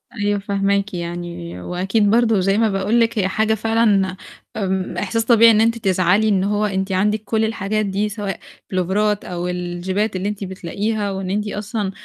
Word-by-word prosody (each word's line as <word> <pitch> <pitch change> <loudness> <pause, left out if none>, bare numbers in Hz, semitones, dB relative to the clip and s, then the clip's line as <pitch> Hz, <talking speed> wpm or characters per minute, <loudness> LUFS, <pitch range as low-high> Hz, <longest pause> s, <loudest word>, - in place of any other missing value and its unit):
أيوه 205 -2 0
فاهماكِ 200 0 0
يعني، 170 - -6
وأكيد 195 - 0
برضه 225 -2 +3
زي 195 +2 +2
ما 225 -1 +3
باقول 195 +4 +1
لِك 230 0 +1
هي 190 - +2
حاجة 220 +3 +1
فعلًا، 215 -4 +2 0.4
إمم، 190 -2 -2
إحساس 225 +3 -1
طبيعي 230 -1 +7
إن 215 -1 +4
أنتِ 230 +1 +2
تزعلي 195 0 +2
إن 195 -2 +2
هو 205 +1 +1
أنتِ 195 -1 -2
عندِك 210 +3 +1
كل 220 +1 0
الحاجات 215 -1 -1
دي 200 +2 -1
سواء 205 -2 -4 0.3
بلوفارات 200 +3 0
أو 175 0 -4
الجيبات 180 +4 -2
اللي 185 +2 -1
أنتِ 210 -1 -5
بتلاقيها، 200 +3 -3
وإن 190 -1 -4
أنتِ 210 +2 -1
أصلًا 205 -1 -3
200 Hz, 175 wpm, -20 LUFS, 190-215 Hz, 0.4 s, طبيعي